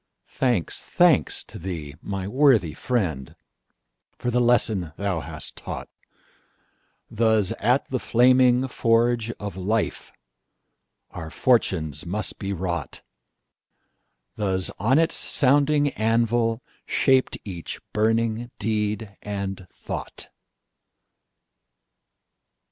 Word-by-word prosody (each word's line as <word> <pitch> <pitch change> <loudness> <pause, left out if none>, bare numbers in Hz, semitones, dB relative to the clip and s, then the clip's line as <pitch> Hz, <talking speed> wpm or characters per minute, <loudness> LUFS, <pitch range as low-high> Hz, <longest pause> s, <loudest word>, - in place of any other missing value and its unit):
Thanks, 120 - -1
thanks - - +3
to - - -11
thee, 80 -5 -5
my 95 -2 -4
worthy 120 - +3
friend, 85 - -2 0.8
For 120 - -2
the 125 +1 +2
lesson 110 -9 +2
thou 100 -4 -1
hast 80 -3 -7
taught! - - -6 1.2
Thus 110 -3 +2
at 125 +5 +2
the 130 - 0
flaming 125 +2 +4
forge 115 -1 +2
of 100 -1 -5
lifeOur 95 -4 -6
fortunes 90 - +1
must 105 +5 -3
be 100 0 -3
wrought; 85 -5 -4 1.3
Thus 95 -3 0
on 120 +8 +3
its 165 0 +3
sounding 145 +1 +2
anvil 115 0 +1 0.2
shapedEach 110 - 0
burning 115 +2 +1
deed 105 -1 -2
and 100 -2 -5
thought! - - -6
110 Hz, 90 wpm, -24 LUFS, 95-120 Hz, 1.3 s, flaming